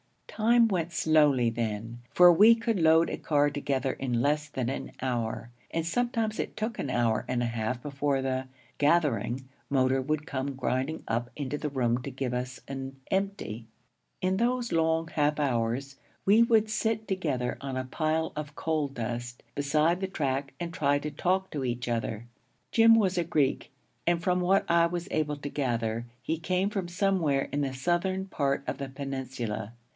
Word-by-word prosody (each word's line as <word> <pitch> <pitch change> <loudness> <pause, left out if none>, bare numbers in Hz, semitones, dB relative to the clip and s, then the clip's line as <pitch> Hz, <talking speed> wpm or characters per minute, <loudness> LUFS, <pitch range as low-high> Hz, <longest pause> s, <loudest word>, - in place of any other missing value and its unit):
Time 230 +1 +4
went 175 -3 -1
slowly 150 -7 +3
then, 115 +1 -4
for 175 +6 +7
we 215 +7 +7
could 230 -3 -1
load 160 0 +5
a - - -3
car 145 -1 +2
together 140 -2 -1
in 125 -3 -2
less 150 +2 +1
than 130 -4 -2
an 135 0 -4
hour; 120 -2 -2 0.2
and 165 -1 -2
sometimes 230 +2 -1
it - - -3
took 220 +2 -3
an 140 - -2
hour 120 -3 +1
and 125 -1 0
a - - 0
half 115 +1 -2
before 140 -1 -1
the 130 0 -1 0.3
'gathering' 135 -5 +2 0.2
motor 130 -1 +2
would 150 +2 -2
come 140 -2 -3
grinding 130 +4 -2
up 120 +1 -1
into 145 0 -3
the 150 - -2
room 125 -3 0
to - - -5
give 130 -2 -3
us 125 +1 -3
an 135 0 -6 0.2
'empty.' 190 - -2 0.5
In 185 +1 +1
those 240 +1 0
long 160 0 +2
half 150 -1 +1
hours 135 0 -1 0.3
we 210 +4 +6
would 220 -2 +4
sit 220 0 -1
together 145 -10 -1
on 135 -2 -4
a 130 - -1
pile 155 +4 -1
of 150 -1 -6
coal 155 -2 0
dust 120 -2 -5
beside 155 +4 +2
the 190 - 0
track 140 -6 -2
and 170 -1 -4
try 145 -5 +2
to 150 +1 -4
talk 185 +5 0
to 145 -3 -3
each 120 -1 -2
other. 115 -1 -2 0.5
Jim 225 0 +7
was 190 -5 +2
a - - +2
Greek, 150 -5 0 0.4
and 170 -1 +2
from 180 0 +2
what 190 +2 +3
I 170 0 +4
was 175 +1 -4
able 150 -1 0
to 145 0 -5
gather, 115 -4 -1 0.2
he 160 - -2
came 185 +4 0
from 195 -4 -2
somewhere 175 -7 +1
in 145 - 0
the 135 -2 -1
southern 175 +6 0
part 140 -7 -1
of - - -4
the 140 -1 -4
peninsula. 130 -5 -4
145 Hz, 180 wpm, -28 LUFS, 130-175 Hz, 0.5 s, for